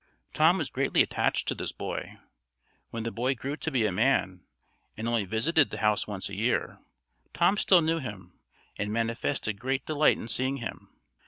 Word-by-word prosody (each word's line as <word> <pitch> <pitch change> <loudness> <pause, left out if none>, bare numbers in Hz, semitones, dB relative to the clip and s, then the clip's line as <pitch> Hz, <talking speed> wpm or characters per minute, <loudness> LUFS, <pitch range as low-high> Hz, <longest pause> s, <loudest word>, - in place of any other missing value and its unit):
Tom 160 +4 +5
was 155 -7 -3
greatly 135 +1 +3
attached - - 0
to - - +2
this - - -4
boy. - - -5 0.7
When 115 -1 -5
the 115 - -3
boy 125 +5 0
grew 135 +4 -4
to 160 - -3
be 125 -7 +1
a 105 - +1
man, 95 -4 +1 0.6
and 110 +2 -3
only 115 -3 +1
visited 140 - +2
the - - -6
house 105 -1 +1
once 100 -3 -5
a 100 - -9
year, 110 +5 -1 0.6
Tom 195 - +4
still 185 -4 +5
knew 165 +1 +1
him, 100 - -8 0.5
and 105 0 -1
manifested 115 -1 -1
great 130 +3 -2
delight 155 -1 +3
in - - -7
seeing 130 +4 0
him. 115 -3 -7
120 Hz, 180 wpm, -28 LUFS, 105-140 Hz, 0.7 s, Tom